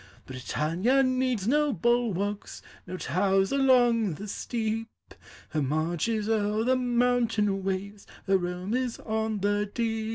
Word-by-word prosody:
Britannia 165 - 0
needs 255 -5 0
no 295 +3 +3
bulwarks, 210 -2 -1 0.2
No 185 +1 -5
towers 195 +2 +1
along 245 - +3
the 205 +7 -8
steep; 225 +1 -3 0.6
Her 155 - -1
march 155 - -1
is 215 -2 -1
o'er 215 0 +1
the 255 +2 +3
mountain 240 -5 +1
waves, 195 +2 -4 0.2
Her 195 -1 +3
home 180 +3 -4
is 250 -2 -1
on 220 -2 -2
the 205 +1 0
deep. 225 -1 -2
215 Hz, 130 wpm, -27 LUFS, 195-240 Hz, 0.6 s, no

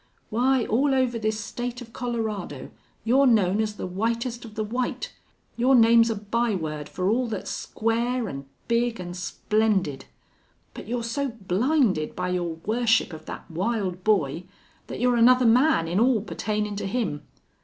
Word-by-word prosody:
Why, 250 +2 +2
all 270 +5 +2
over 250 -3 +1
this 215 0 -1
state 240 +3 -5
of 230 -3 -11
Colorado 220 - -4 0.3
you're 265 +5 +4
known 210 -3 +3
as 215 -1 -2
the - - -5
whitest 230 +6 -2
of 220 -2 -11
the 215 - -1
white. 245 +4 -3 0.4
Your 255 +3 +4
name's 230 -1 +6
a 225 - 0
byword 200 -9 -2
for 185 0 -2
all 240 +4 +2
that's 220 - -4
square 235 +2 -1
an' 140 -5 -6 0.2
big 235 0 +1
an' 175 -1 -6
splendid. 190 -4 0 0.7
But - - -9
you're 240 +1 -2
so 275 +5 -1
blinded 220 - 0
by 180 0 -2
your 175 -2 -2
worship 225 -4 +2
of 155 - -10
that - - -8
wild 185 0 -2
boy 175 -6 +1 0.4
that - - -6
you're 245 0 +2
another 250 +2 +5
man 240 - +4
in 175 +4 0
all 240 -2 +3
pertainin' 210 -1 -3
to 200 - -3
him. 200 -9 -2
225 Hz, 160 wpm, -25 LUFS, 190-240 Hz, 0.7 s, name's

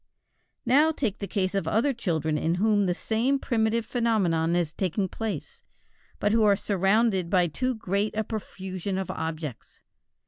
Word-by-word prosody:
Now 295 +5 +5
take 235 -10 -2
the 200 - -4
case 190 -2 -1
of 195 - -1
other 240 +6 +2
children 160 - -1
in 160 +3 0
whom 205 +1 +2
the 175 - +1
same 235 +8 +1
primitive 225 -3 0
phenomenon 190 -9 +1
is 170 -3 0
taking 190 +1 -1
place, 225 - -5 0.6
but 205 - +1
who 225 +1 +3
are 205 -2 +5
surrounded 195 -1 +1
by 180 -2 +3
too 255 - -1
great 205 0 -1
a 220 - +1
profusion 190 -3 -5
of 190 -2 -3
objects. 155 -6 -6
200 Hz, 160 wpm, -26 LUFS, 180-225 Hz, 0.6 s, Now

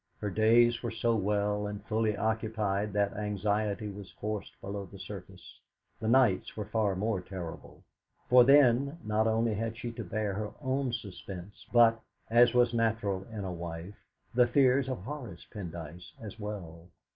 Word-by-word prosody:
Her 105 - -3
days 115 +3 +4
were 120 - -2
so 115 +1 0
well 105 0 0
and 105 0 -7
fully 110 -1 0
occupied 110 -2 -1
that 100 -1 +1
anxiety 105 0 -1
was 100 -2 -8
forced 105 -1 -5
below 100 0 -5
the 100 - -12
surface. 95 -1 -10 0.4
The 110 - -3
nights 115 -6 +3
were 105 - -3
far 105 -2 0
more 100 0 -1
terrible; 90 -3 -8 0.4
for 125 0 +8
then, 140 +2 +5
not 110 +1 +1
only 110 0 +2
had 115 +1 -3
she 120 0 -4
to 115 - -6
bear 105 -2 -2
her 105 +1 -4
own 130 -1 -1
suspense, 100 -3 -8
but, 115 -1 +5 0.3
as 120 +1 +6
was 120 -1 +4
natural 110 -4 0
in 105 -2 -5
a 95 -2 -3
wife, 85 +3 -7 0.3
the 125 0 +5
fears 130 +1 +3
of 125 -8 -4
Horace 125 - -7
Pendyce 85 -4 -8
as 110 0 -9
well. 90 -6 -7
105 Hz, 160 wpm, -30 LUFS, 100-115 Hz, 0.4 s, for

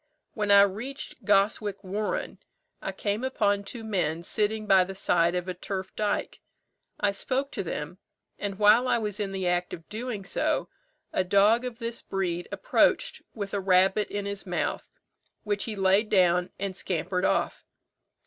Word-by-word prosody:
When 210 -2 -2
I 200 0 +9
reached 240 +9 -4
Goswick 205 0 +2
warren, 205 +3 -3 0.4
I - - -3
came 205 +3 -2
upon 205 -6 +1
two 225 +3 -8
men 175 -6 -1
sitting 215 +3 -1
by 195 -2 +6
the 190 +1 -7
side 175 -2 +2
of 180 0 -2
a 185 - -2
turf 190 +1 -5
dyke. 210 -1 -1 0.6
I 205 - +2
spoke 265 +7 -2
to - - -3
them; 170 0 -5 0.4
and 200 -1 -3
while 215 +5 +5
I 250 - +3
was 210 -2 -3
in 200 -2 -2
the 190 -2 -2
act 175 0 0
of 165 - -17
doing 220 -2 -4
so, - - 0 0.4
a 185 - +2
dog 205 +6 +4
of 245 -2 -5
this 230 -1 -5
breed 175 -3 -2
approached - - +2
with 200 -2 -5
a 200 - +1
rabbit 190 +2 +3
in 205 0 -3
his 200 0 -4
mouth, 180 - -2 0.5
which 205 -1 -1
he 220 - -4
laid 195 +2 +3
down 180 -2 +3
and 195 -1 -3
scampered 180 0 -2
off. - - 0
200 Hz, 165 wpm, -27 LUFS, 185-215 Hz, 0.6 s, I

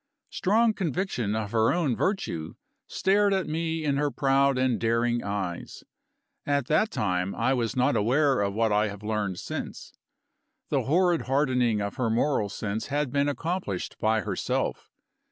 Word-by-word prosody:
Strong 220 +3 +2
conviction 160 - -2
of 110 -2 -3
her 110 -1 +3
own 160 -8 +1
virtue 150 - -2 0.3
stared 200 +1 +2
at 190 - 0
me 160 0 -2
in 140 -2 +1
her 145 0 +1
proud 135 -1 +2
and 130 -2 +1
daring 120 +1 +1
eyes. 100 -4 -4 0.6
At 140 -2 0
that 185 +8 +3
time, 90 - -1
I 130 - +1
was 120 -3 -1
not 130 +3 +2
aware 130 +4 +2
of 100 0 -1
what 110 0 +2
I 105 +1 +3
have 100 0 -8
learned 105 -3 -2
since. - - -6 0.8
The - - 0
horrid 175 +2 +2
hardening 125 -5 +2
of 100 0 -4
her 125 -3 0
moral 115 -2 +1
sense 105 +2 -4
had 145 -2 -1
been 140 +1 +1
accomplished 160 - -3
by 110 0 +2
herself. - - -2
130 Hz, 155 wpm, -27 LUFS, 105-150 Hz, 0.8 s, her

